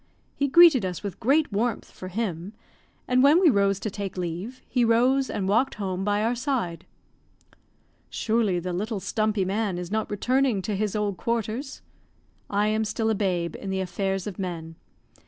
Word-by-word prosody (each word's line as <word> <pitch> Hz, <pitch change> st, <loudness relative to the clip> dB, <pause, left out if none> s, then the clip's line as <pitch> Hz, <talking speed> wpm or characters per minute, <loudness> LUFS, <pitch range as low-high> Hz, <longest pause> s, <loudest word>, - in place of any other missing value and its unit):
He 280 Hz, -, 0 dB
greeted 315 Hz, -, +7 dB
us 180 Hz, 0 st, -4 dB
with 200 Hz, -3 st, -5 dB
great 280 Hz, +2 st, +2 dB
warmth 225 Hz, +2 st, -1 dB
for 185 Hz, -, -9 dB
him, 185 Hz, -2 st, -4 dB, 0.5 s
and 250 Hz, 0 st, +3 dB
when 290 Hz, +5 st, +6 dB
we 355 Hz, -5 st, +6 dB
rose 200 Hz, -2 st, +2 dB
to 215 Hz, -, -3 dB
take 195 Hz, -2 st, -5 dB
leave, 180 Hz, +8 st, -4 dB
he 250 Hz, -2 st, +1 dB
rose 250 Hz, +4 st, +3 dB
and 190 Hz, -, -2 dB
walked 235 Hz, +7 st, +2 dB
home 190 Hz, -2 st, -3 dB
by 205 Hz, +1 st, +1 dB
our 230 Hz, +2 st, +1 dB
side. 240 Hz, -, -2 dB, 1.2 s
"Surely 220 Hz, -5 st, 0 dB
the 180 Hz, +1 st, -3 dB
little 210 Hz, +4 st, -2 dB
stumpy 215 Hz, 0 st, 0 dB
man 200 Hz, -1 st, -1 dB
is 175 Hz, +1 st, -6 dB
not 220 Hz, 0 st, -1 dB
returning 245 Hz, 0 st, +1 dB
to 210 Hz, 0 st, -2 dB
his 210 Hz, +1 st, -1 dB
old 205 Hz, -3 st, -1 dB
quarters?" 235 Hz, -, -3 dB, 0.7 s
I 205 Hz, +1 st, +1 dB
am 215 Hz, +1 st, +1 dB
still 220 Hz, +1 st, -1 dB
a -, -, +2 dB
babe 180 Hz, -5 st, -1 dB
in 195 Hz, -, -6 dB
the 190 Hz, 0 st, -1 dB
affairs 190 Hz, +1 st, -2 dB
of 205 Hz, -3 st, -6 dB
men. 170 Hz, -3 st, -5 dB
210 Hz, 175 wpm, -25 LUFS, 190-235 Hz, 1.2 s, greeted